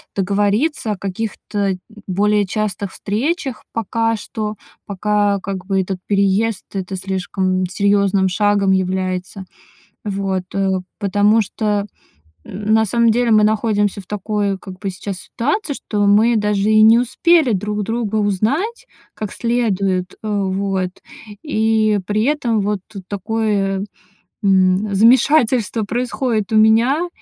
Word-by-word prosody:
договориться 205 - 0
о 205 - -3
каких-то 200 0 -3 0.3
более 205 +2 +2
частых 200 -1 -3
встречах. 265 - -2
Пока 225 +1 0
что, 215 0 -5 0.3
пока, 205 0 0
как 190 -2 -5
бы, 195 -1 +1
этот 185 0 -4
переезд- 200 +2 +1
это 190 -1 -4
слишком 185 0 -1
серьёзным 200 0 +2
шагом 200 0 +2
является. 185 0 -2 0.6
Вот, 195 -2 -2
э. 190 -1 0 0.2
Потому 205 +2 +3
что, 205 0 -1 0.6
на 215 +2 +1
самом 230 +2 +2
деле, 235 +1 +2
мы 215 -1 +5
находимся 210 -2 +1
в 190 - -15
такой, 205 0 -2
как 185 -1 -10
бы, 195 0 -3
сейчас 190 +1 -6
ситуации, 295 - -2
что 205 -4 -1
мы 220 +4 +4
даже 210 -1 +1
и 215 0 +5
не 225 +2 +7
успели 275 +3 +3
друг 210 +1 -2
друга 225 -1 -2
узнать 220 - -1 0.3
как 215 -3 -5
следует, 200 -6 -1
э, 215 - -4
вот. 195 -2 -1 0.5
И 220 -6 +1
при 210 +2 0
этом 250 -6 +1
вот 205 0 -1 0.3
такое, 200 -1 -1 0.6
м, 190 +1 +3
замешательство 235 0 +3
происходит 240 -2 -2
у - - +1
меня 235 +10 +4
205 Hz, 125 wpm, -18 LUFS, 195-225 Hz, 0.6 s, не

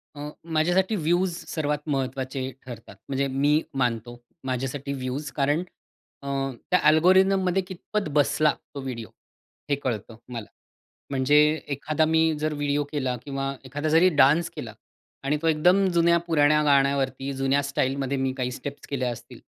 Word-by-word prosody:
अं, 145 +1 -6 0.2
माझ्यासाठी 175 +6 +2
व्यूज 175 +1 +1
सर्वात 150 -2 -1
महत्त्वाचे 130 -1 -2
ठरतात, 120 -3 -10
म्हणजे 140 0 0
मी 145 +3 +2 0.2
मानतो 120 -1 -1 0.3
माझ्यासाठी 135 +2 -3
व्यूज, 130 +2 -4
कारण 145 +4 +1 0.6
अ, 140 - -9 0.4
त्या 180 - +5
अल्गोरिदममध्ये 185 +3 +4
कितपत 190 +3 -4
बसला 150 +1 +3 0.2
तो 140 - -4
व्हिडिओ, 120 -4 -6 0.6
हे 140 - +3
कळतं 120 -5 -4
मला. 115 -3 -5 0.6
म्हणजे 135 +2 +3 0.4
एखादा 155 +3 0
मी 160 0 +3 0.2
जर 155 0 -1
व्हिडिओ 145 0 0
केला 130 -4 -1
किंवा 135 -1 -3
एखादा 145 +4 -3
जरी 165 +4 +5
डान्स 150 +5 +5
केला - - -6 0.5
आणि 150 +2 +1
तो 165 - 0
एकदम 180 +5 +4
जुन्या-पुराण्या 165 -3 +3
गाण्यावरती 140 -1 +2
जुन्या 135 +1 +1
स्टाईलमध्ये 135 0 -1
मी 130 0 0
काही 125 -1 -1
स्टेप्स 140 +3 -7
केल्या 130 -3 -1
असतील, 115 - -10
140 Hz, 140 wpm, -25 LUFS, 135-155 Hz, 0.6 s, त्या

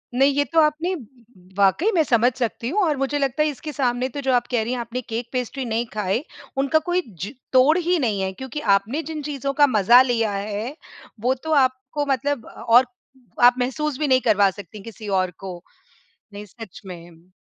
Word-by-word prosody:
नहीं 275 +2 +4
ये 285 +1 +2
तो 325 - +5
आपने 310 +4 +1 0.6
वाक़ई 200 - +3
मैं 320 - +4
समझ 245 -1 +3
सकती 235 -1 -3
हूँ 410 +6 +1
और 305 -5 +1
मुझे 275 +2 -1
लगता 275 +2 +1
है 305 - +1
इसके 300 +2 -7
सामने 250 -1 0
तो 285 +2 -6
जो 265 -1 +1
आप 245 -1 +1
कह 240 - +2
रही 240 +3 -3
हैं 250 - -3
आपने 235 +2 -4
केक-पेस्ट्री 245 +2 -4
नहीं 230 +1 -1
खाए, 210 +5 -1 0.3
उनका 280 +3 +2
कोई 355 +1 +1
जो 195 +2 -7 0.2
तोड़ 275 +6 +5
ही 355 +1 +1
नहीं 215 -7 0
है 190 0 -1
क्योंकि 265 +7 -6 0.2
आपने 225 +11 -2
जिन 310 -2 -4
चीज़ों 275 -1 -3
का 290 0 +5
मज़ा 235 +2 +6
लिया 230 -4 +1
है 210 +6 -4 0.4
वो 250 +4 +1
तो 315 - -3
आपको 260 +3 -2
मतलब 270 -1 -1
अ, - - -11
और 245 +2 +3 0.6
आप 245 0 +7
महसूस 270 +3 -2
भी 300 - 0
नहीं 260 -1 +4
करवा 205 -3 +4
सकतीं 205 +1 -11
किसी 220 -1 -10
और 185 -1 -1
को 185 -3 -8 0.7
नहीं 205 +1 -8
सच 210 0 -12
में। 175 -1 -12
250 Hz, 200 wpm, -22 LUFS, 215-285 Hz, 0.7 s, आप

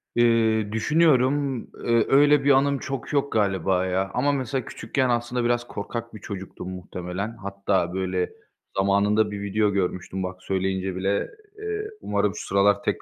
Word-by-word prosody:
Eee, 110 -3 +3
düşünüyorum, 140 +1 +3 0.2
ııı, 115 -1 +2
öyle 145 0 +5
bir 140 - +5
anım 140 0 +3
çok 135 +1 -5
yok 140 -1 +1
galiba 95 -3 +1
ya 95 +1 -1
ama 140 +4 +2
mesela 130 -2 -2
küçükken 130 +3 -1
aslında 120 +1 0
biraz 120 0 +1
korkak 115 +3 -5
bir 110 - -9
çocuktum 95 -3 -7
muhtemelen. 90 +4 -5
Hatta, 95 -2 -1
böyle, 95 -1 -1 0.5
zamanında 105 +2 +3
bir 100 -1 -5
video 105 +1 +1
görmüştüm 95 -1 -2
bak 90 0 -6
söyleyince 95 0 -1
bile, 95 +2 0 0.3
eee, 430 0 -3
umarım 100 0 0
şu - - -6
sıralar 100 +1 +3
tek - - -1
105 Hz, 150 wpm, -25 LUFS, 95-125 Hz, 0.5 s, öyle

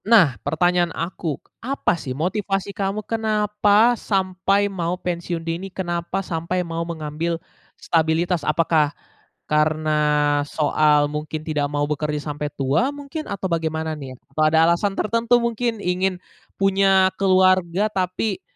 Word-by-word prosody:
Nah 205 - +6
pertanyaan 175 +4 +1
aku, 165 -3 -3 0.2
apa 270 -5 0
sih 135 -6 -5
motivasi 195 +3 -1
kamu 200 +2 -2
kenapa 215 0 +2
sampai 195 -2 0
mau 180 -3 -2
pensiun 175 -2 -4
dini, 170 +4 -3
kenapa 175 0 -3
sampai 175 +2 -2
mau 165 0 -4
mengambil 165 0 -3 0.4
stabilitas, 165 +1 +1
apakah 155 -1 +2 0.6
karena 150 -1 +2
soal 150 -1 +3
mungkin 150 +1 -5
tidak 150 -3 -1
mau 145 0 0
bekerja 150 0 -2 0.2
sampai 150 0 -4
tua 145 - +1
mungkin, 285 +2 -7
atau 195 - -4
bagaimana 160 -1 -1
nih? 135 -4 -8 0.2
Atau 155 - -1
ada 160 +1 +4
alasan 195 +3 +1
tertentu 230 +2 +2
mungkin 235 0 -1
ingin 180 +1 0 0.4
punya 195 -1 +3
keluarga 185 0 +3
tapi 190 +2 -1
175 Hz, 125 wpm, -22 LUFS, 155-195 Hz, 0.6 s, Nah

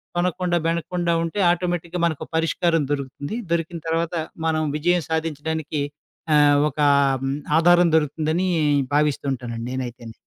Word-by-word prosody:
తొనకుండా, 175 0 0
బెనకుండా 170 +1 -1
ఉంటే 165 +5 -3
ఆటోమేటిక్‌గా 175 0 -1
మనకు 160 -4 -2
పరిష్కారం 165 0 +1
దొరుకుతుంది. 145 - -4 0.2
దొరికిన 170 0 -1
తర్వాత 165 +1 -1 0.3
మనం 160 -1 +1
విజయం 175 +2 +1
సాధించడానికి 160 -1 -2 0.5
ఆహ్, 145 -1 +5
ఒక 150 - -12 0.8
ఆధారం 175 +1 +5
దొరుకుతుందని 155 +4 0 0.5
భావిస్తుంటానండి 130 -5 -1
నేనైతేని. 120 -3 -6
160 Hz, 105 wpm, -22 LUFS, 145-175 Hz, 0.8 s, ఆహ్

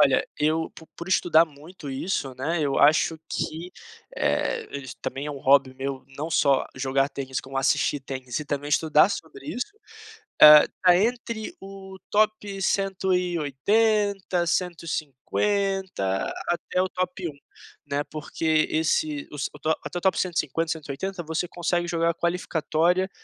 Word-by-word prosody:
Olha, - - +4
eu 160 +2 +1
po 160 - -13
por 170 - -7
estudar 170 -3 +4
muito 155 0 -11
isso, 135 -1 -2
né, 160 +6 -1
eu 140 -2 0
acho 155 +2 +4
que, 165 +3 -4 0.5
eh, 470 -2 0
isso 130 -3 -9
também 135 +2 -4
é - - -3
um 140 - -6
hobby 135 -1 +4
meu 135 0 -4
não 155 +3 -4
só 140 -3 +3
jogar 135 +1 +1
tênis 135 -2 -4
como 135 0 -8
assistir 140 +1 +1
tênis 130 -1 -5
e - - -5
também 145 0 -3
estudar 155 +3 +4
sobre 410 - -7
isso, 250 -5 -2 0.8
ah, 150 0 +11 0.2
tá 180 -1 +6
entre 230 +1 -1
o 195 0 -10
top 210 -2 +1
180, 190 +1 +1
150 175 - -1 0.2
até 175 +1 -1
o 185 - -1
top 180 -1 -3
1, 145 -2 -11 0.5
né, 145 0 -1
porque 155 +1 0
esse 155 -2 0
os 145 -1 -3
o - - -15 0.3
até 175 - -4
o - - -9
top 190 - +2
150, 165 -2 -1
180 165 +5 -5
você 160 +2 -2
consegue 175 0 -1
jogar 170 0 +1
a - - -2
qualificatória 175 +1 0
165 Hz, 145 wpm, -25 LUFS, 145-185 Hz, 0.8 s, ah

